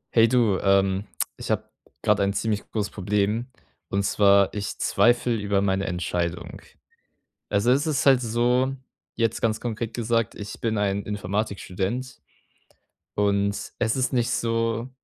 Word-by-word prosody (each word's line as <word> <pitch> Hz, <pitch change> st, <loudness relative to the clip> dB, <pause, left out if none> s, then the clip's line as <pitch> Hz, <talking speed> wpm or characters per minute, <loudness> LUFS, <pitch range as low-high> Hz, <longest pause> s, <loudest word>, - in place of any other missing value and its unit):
Hey 115 Hz, 0 st, +7 dB
du, 115 Hz, -5 st, +2 dB
ähm, 95 Hz, 0 st, +2 dB, 0.3 s
ich -, -, -7 dB
habe -, -, -1 dB, 0.3 s
gerade -, -, +3 dB
ein 100 Hz, 0 st, +1 dB
ziemlich 105 Hz, 0 st, -2 dB
großes 105 Hz, -2 st, -2 dB
Problem, 105 Hz, +4 st, 0 dB, 0.4 s
und 100 Hz, 0 st, 0 dB
zwar 100 Hz, -1 st, +4 dB
ich 105 Hz, -1 st, -4 dB
zweifle 120 Hz, 0 st, +2 dB
über 100 Hz, -2 st, 0 dB
meine 95 Hz, 0 st, +1 dB
Entscheidung. 90 Hz, -1 st, -3 dB, 0.9 s
Also, 105 Hz, +4 st, +2 dB
es 140 Hz, +4 st, +2 dB
ist 140 Hz, -4 st, 0 dB
halt 135 Hz, -2 st, +6 dB
so 120 Hz, +3 st, +1 dB, 0.4 s
jetzt 115 Hz, -1 st, 0 dB
ganz 110 Hz, -1 st, +1 dB
konkret 115 Hz, -1 st, -4 dB
gesagt, 115 Hz, -1 st, -1 dB
ich 105 Hz, -1 st, -8 dB
bin 110 Hz, -2 st, 0 dB
ein 100 Hz, 0 st, 0 dB
Informatikstudent. 105 Hz, +3 st, -3 dB, 0.9 s
Und 100 Hz, 0 st, 0 dB
es 115 Hz, 0 st, +1 dB
ist 130 Hz, +1 st, 0 dB
nicht 120 Hz, -2 st, +1 dB
so, 115 Hz, +1 st, -1 dB
105 Hz, 140 wpm, -25 LUFS, 100-120 Hz, 0.9 s, Hey